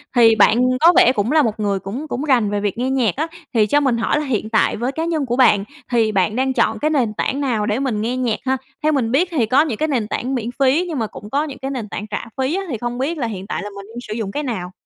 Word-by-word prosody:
Thì 230 -2 +6
bạn 220 +1 +5 0.2
có 340 +4 +6
vẻ 250 - +7
cũng 225 +1 -1
là 315 - +5
một 225 -4 -1
người 200 -2 0
cũng 240 +12 -6
cũng 270 +1 -3
rành 245 -8 +2
về 205 0 -1
việc 205 0 -2
nghe 250 +2 -1
nhạc 250 -8 +1
á, 310 +4 -1 0.3
thì 220 -3 +4
cho 290 - +3
mình 265 -5 +1
hỏi 230 +6 +1
là 300 - -3
hiện 225 -5 -2
tại 220 - +2
với 245 +4 -1
cá 320 +4 -3
nhân 320 -4 -1
của 245 -1 -1
bạn 210 -6 +4 0.3
thì 225 -3 +2
bạn 195 +2 +1
đang 265 +1 +1
chọn 235 - +1
cái 305 - +1
nền 255 -8 +1
tảng 275 +6 -2
nào 235 -7 0
để 210 +3 0
mình 250 -6 -1
nghe 240 +3 -1
nhạc 240 -4 -1
ha? 265 0 +1 0.3
Theo 310 - +3
mình 250 -6 0
biết 325 +8 +3
thì 255 -9 +1
có 260 +6 +4
những 280 -9 -1
cái 310 - 0
nền 240 -8 -1
tảng 260 +4 -2
miễn 235 -1 -3
phí, 275 +7 +3
nhưng 305 -7 -3
mà 220 - -1
cũng 205 - -11
có 285 +5 +1
những 285 -4 -7
cái 270 +1 -4
nền 235 -6 -5
tảng 210 +2 -5
trả 210 - -4
phí 265 +6 0
á, 390 - -2
thì 240 - -2
không 240 +2 -4
biết 295 +6 -2
là 250 -5 -1
hiện 195 -3 -6
tại - - -3
là 205 - -5
mình 200 0 -8
đang 240 - -6
sử 215 - -4
dụng 215 -3 -3
cái 295 - -3
nào? 190 -8 -4
245 Hz, 305 wpm, -20 LUFS, 215-275 Hz, 0.3 s, vẻ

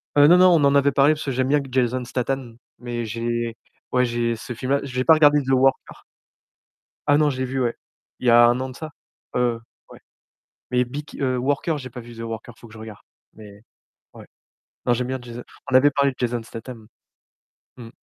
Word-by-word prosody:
Heu, 145 0 +7
non, 175 +3 +7
non, 185 0 +6
on 150 -3 +3
en 140 0 +3
avait 140 0 +4
parlé 140 +3 +4
parce 155 - -6
que 140 - -3
j'aime 130 0 0
bien 145 +1 +2
q 135 - -10
Jason 125 0 0
Statham, 125 -1 -4 0.2
mais 120 -1 -4
j'ai 115 +1 -3 0.4
ouais, 125 0 +3
j'ai 120 -1 -1
ce 115 - -9
film-là. 130 +4 -1
J'ai 130 -2 -3
pas 160 - +7
regardé 150 -2 +5
The 135 -1 -3
Worker. 135 +1 +1 1.0
Ah, 145 - +5
non, 150 -1 +3
je 135 - -4
l'ai 130 - -1
vu, 130 +1 -3
ouais. 120 -2 -1 0.4
Il 125 - -3
y - - +6
a 120 0 +7
1 120 +1 +2
an 130 0 -4
de 130 - -11
ça. 155 +1 -8 0.4
Heu, 120 -2 0 0.3
ouais. - - -13 0.7
Mais 125 0 +2
Beek 145 +4 -8
heu, 130 -2 0
Worker, 145 +5 -1
j'ai 130 -2 -9
pas 125 +1 -9
vu 120 0 -12
The 115 - -11
Worker, 115 +1 -7
il - - -26
faut - - -13
que 110 - -16
je - - -12
regarde. 110 -1 -10 0.3
Mais, 105 -1 -14 0.5
ouais. - - -13 0.6
Non, 120 - +3
j'aime 125 +1 -2
bien 130 0 -3
Jason 120 0 -9 0.3
on - - +2
avait 145 +3 +6
parlé 140 0 +1
de - - -16
Jason 120 -1 -2
Statham. 115 -1 -10 0.9
Mmh. 120 -3 -10
125 Hz, 225 wpm, -22 LUFS, 120-140 Hz, 1.0 s, Heu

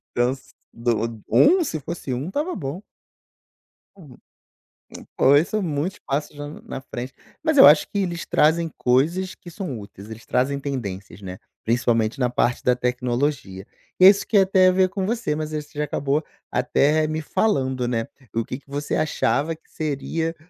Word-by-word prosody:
Então 120 +2 +1
se 135 - -18 0.2
do 115 -2 -2
um, 355 +4 +5
se 155 - -3
fosse 145 -2 -5
um 135 +7 -4
estava 300 - -2
bom. 150 +4 -5 1.1
Uhum. 150 -10 -15 1.0
Poxa, 140 - +5
isso 160 +8 +2
é 215 - +1
muitos 165 +2 -2
passos 145 +2 -2
já 145 0 -6
na 150 - -10
na 130 - -7
frente. 130 0 -7 0.3
Mas 315 -2 +1
eu - - +10
acho 150 +1 +6
que 205 - -3
eles 175 -4 -2
trazem 165 +2 +2
coisas 165 +10 +1
que 175 - -13
são 160 - -5
úteis, 100 +1 -12
eles 110 +1 -10
trazem 140 +3 0
tendências, 105 -9 -5
né. 95 -1 -8 0.2
Principalmente 115 0 +1
na 125 -2 +2
parte 120 0 0
da 125 - +3
tecnologia. 125 -5 -2 0.3
E 185 - +8
é 190 - +12
isso 200 0 +3
que - - -3
ia 195 - +7
até 190 -1 +4
a - - +6
ver 185 0 +3
com 195 0 -3
você, 225 -7 -1
mas 155 0 -4
aí 150 - -2
você 150 0 -16
já 150 - 0
acabou 145 +1 -1 0.3
até 155 +2 +2
me 155 +1 -2
falando, 130 - 0
né. 115 -2 -1 0.3
O 115 - 0
que 125 - -6
que 140 - -28
você 145 +1 -3
achava 155 0 0
que 160 - -29
seria 160 +2 -3
145 Hz, 185 wpm, -23 LUFS, 125-170 Hz, 1.1 s, é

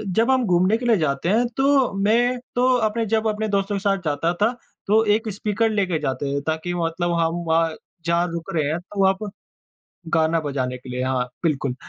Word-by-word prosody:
जब 230 +4 +3
हम 260 -2 +2
घूमने 185 +3 +3
के 245 - -6
लिए 230 -3 +4
जाते 155 0 -1
हैं, 230 +5 +3
तो 270 -3 +3
मैं 235 +5 +2 0.2
तो 250 +1 +3 0.2
अपने 225 +1 -2
जब 220 +1 0
अपने 215 0 -1
दोस्तों 200 0 0
के - - -1
साथ 195 0 +1
जाता 155 +3 0
था, 215 +3 +4 0.4
तो 220 +2 +4
एक 220 0 -3
स्पीकर 210 +3 0
लेके 190 -7 0
जाते 140 +1 -2
थे, 140 - -1
ताकि 160 +4 -3
मतलब 175 0 -1
हम 165 0 +1
वहाँ, 165 0 +2 0.3
जहाँ 170 +1 +2
रुक 170 0 -5
रहे 150 -3 +1
हैं, 160 +3 -1
तो 195 +3 -9
वहाँ 190 0 +5
पर 210 - -4 0.8
गाना 160 0 +3
बजाने 130 -4 -3
के 125 +1 -13
लिए। 125 +1 -3
हाँ, 130 -1 0 0.2
बिल्कुल। 140 -5 0
180 Hz, 205 wpm, -22 LUFS, 160-220 Hz, 0.8 s, वहाँ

